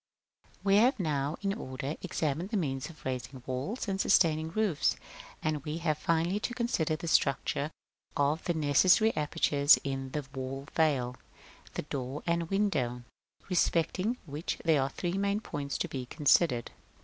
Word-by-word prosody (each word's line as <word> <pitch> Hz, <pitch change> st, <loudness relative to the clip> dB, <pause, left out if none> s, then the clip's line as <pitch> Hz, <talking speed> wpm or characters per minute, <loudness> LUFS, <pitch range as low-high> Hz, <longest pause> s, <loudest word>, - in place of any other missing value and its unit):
§ -, -, -28 dB
I. -, -, -30 dB
We 195 Hz, -1 st, +4 dB
have 240 Hz, +3 st, +4 dB
now, 150 Hz, -3 st, -1 dB
in 195 Hz, 0 st, +1 dB
order, 135 Hz, -, -5 dB
examined 155 Hz, +4 st, -2 dB
the 220 Hz, -, 0 dB
means 135 Hz, -6 st, -2 dB
of 165 Hz, -, -15 dB
raising 130 Hz, 0 st, -4 dB
walls 135 Hz, -, -3 dB
and 195 Hz, -1 st, 0 dB
sustaining 160 Hz, -4 st, +3 dB
roofs, 200 Hz, -4 st, +1 dB, 0.5 s
and 155 Hz, -2 st, -1 dB
we 150 Hz, +2 st, -3 dB
have 155 Hz, -3 st, -1 dB
finally 170 Hz, +4 st, +1 dB
to 240 Hz, +3 st, -3 dB
consider 230 Hz, -11 st, 0 dB
the 170 Hz, -, -6 dB
structure 140 Hz, -1 st, +1 dB, 0.5 s
of 145 Hz, +3 st, +1 dB
the 175 Hz, -, 0 dB
necessary 175 Hz, +9 st, +4 dB
apertures 145 Hz, -1 st, +4 dB
in 135 Hz, -1 st, -3 dB
the 150 Hz, -2 st, -2 dB
wall 135 Hz, +1 st, -5 dB
veil, 130 Hz, -6 st, +1 dB, 0.6 s
the -, -, -2 dB
door 140 Hz, -1 st, -5 dB
and 170 Hz, -1 st, 0 dB
window; 140 Hz, -12 st, 0 dB, 0.4 s
respecting 185 Hz, +5 st, +1 dB
which 150 Hz, +2 st, -4 dB
there 160 Hz, -4 st, +4 dB
are 135 Hz, -, 0 dB
three 175 Hz, +6 st, -2 dB
main 200 Hz, +1 st, +1 dB
points 145 Hz, -9 st, -4 dB
to -, -, -1 dB
be 130 Hz, -2 st, -5 dB
considered. 145 Hz, -4 st, +3 dB
155 Hz, 160 wpm, -30 LUFS, 140-180 Hz, 0.6 s, We